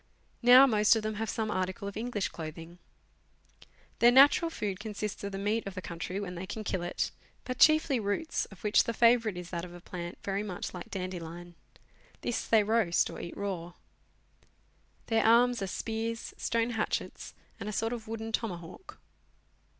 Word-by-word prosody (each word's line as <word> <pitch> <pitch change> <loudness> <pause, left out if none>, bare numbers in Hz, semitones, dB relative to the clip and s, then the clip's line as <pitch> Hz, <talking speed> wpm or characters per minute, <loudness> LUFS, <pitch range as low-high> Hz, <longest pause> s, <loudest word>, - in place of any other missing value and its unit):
Now 250 +2 +9
most 215 -4 +4
of 220 - -1
them 215 0 -2
have 225 - -2
some 220 -1 -2
article 185 +1 -2
of 200 - -6
English 220 -3 -2
clothing. 165 +2 -8 1.2
Their 235 - +7
natural 285 +6 +6
food 200 - -4
consists 210 -1 -5
of 200 - -3
the 195 - -4
meat 210 +2 -1
of 195 - -6
the - - -4
country 175 +3 -4
when 190 -3 -5
they 180 +2 -6
can 215 +2 -5
kill 190 -3 -2
it, 175 0 -2 0.3
but 255 0 -5
chiefly 310 -4 +5
roots, 210 +10 -1
of 195 -4 -16
which 210 -1 +4
the 230 - -2
favourite 230 -4 +4
is 180 -1 -7
that 170 -2 -3
of 175 -1 -9
a - - -10
plant 175 0 -7
very 195 0 -1
much 195 -4 -5
like 180 -2 -8
dandelion. 175 -2 -6 0.7
This 240 - -2
they 220 -2 +5
roast 215 -5 +2
or - - -7
eat 170 - -8
raw. 175 -4 -4 1.3
Their 225 -1 +2
arms 235 +1 +4
are 195 - -1
spears, 225 +3 -4
stone 230 +1 0
hatchets, 220 -2 -3 0.2
and 210 0 -4
a - - -3
sort 225 +3 -1
of 230 -2 -7
wooden 225 0 -5
tomahawk. 185 - -5
210 Hz, 180 wpm, -30 LUFS, 180-230 Hz, 1.3 s, Now